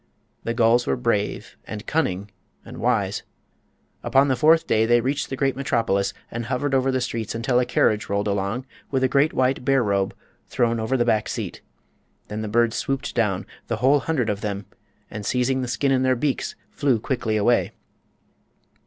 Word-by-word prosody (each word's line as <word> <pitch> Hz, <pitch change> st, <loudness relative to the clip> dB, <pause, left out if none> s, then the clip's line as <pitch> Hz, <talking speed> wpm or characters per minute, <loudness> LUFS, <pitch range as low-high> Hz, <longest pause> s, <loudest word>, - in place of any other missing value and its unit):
The 115 Hz, -, -2 dB
gulls 120 Hz, +1 st, +3 dB
were -, -, +2 dB
brave, 115 Hz, -5 st, -2 dB
and 110 Hz, +1 st, -7 dB
cunning, 100 Hz, -, -1 dB, 0.3 s
and -, -, -10 dB
wise. -, -, 0 dB, 0.8 s
Upon 135 Hz, +1 st, +3 dB
the 130 Hz, -, +3 dB
fourth 160 Hz, +6 st, +4 dB
day 110 Hz, +1 st, +2 dB
they 120 Hz, +1 st, +5 dB
reached 135 Hz, +4 st, -1 dB
the 135 Hz, -, -3 dB
great 135 Hz, +1 st, 0 dB
metropolis, 115 Hz, -7 st, 0 dB, 0.2 s
and 120 Hz, 0 st, -4 dB
hovered 130 Hz, +3 st, -1 dB
over 135 Hz, 0 st, +2 dB
the 130 Hz, -, +1 dB
streets 115 Hz, -3 st, -3 dB
until 120 Hz, +2 st, +1 dB
a 125 Hz, -, +2 dB
carriage 110 Hz, -3 st, +1 dB
rolled 100 Hz, +1 st, 0 dB
along 100 Hz, +5 st, -1 dB, 0.2 s
with 130 Hz, -1 st, 0 dB
a -, -, +5 dB
great 140 Hz, +4 st, +3 dB
white 130 Hz, 0 st, +1 dB
bear 135 Hz, -1 st, +3 dB
robe 100 Hz, -2 st, 0 dB, 0.3 s
thrown 115 Hz, -1 st, +1 dB
over 110 Hz, +4 st, 0 dB
the 120 Hz, -, +2 dB
back 110 Hz, -3 st, +1 dB
seat. -, -, -5 dB, 0.7 s
Then 105 Hz, +1 st, -4 dB
the 110 Hz, -, -3 dB
birds 115 Hz, +2 st, +2 dB
swooped 135 Hz, 0 st, -2 dB
down—the 105 Hz, -5 st, -2 dB
whole 135 Hz, +6 st, +4 dB
hundred 135 Hz, -7 st, 0 dB
of 100 Hz, 0 st, -4 dB
them—and 105 Hz, +1 st, -8 dB
seizing 125 Hz, +4 st, +1 dB
the 125 Hz, -, -3 dB
skin 135 Hz, +3 st, 0 dB
in 130 Hz, -1 st, +3 dB
their 130 Hz, 0 st, +3 dB
beaks 135 Hz, +2 st, -1 dB, 0.2 s
flew 135 Hz, -6 st, +1 dB
quickly 110 Hz, -2 st, -1 dB
away. 120 Hz, +3 st, +2 dB
120 Hz, 180 wpm, -23 LUFS, 105-130 Hz, 0.8 s, they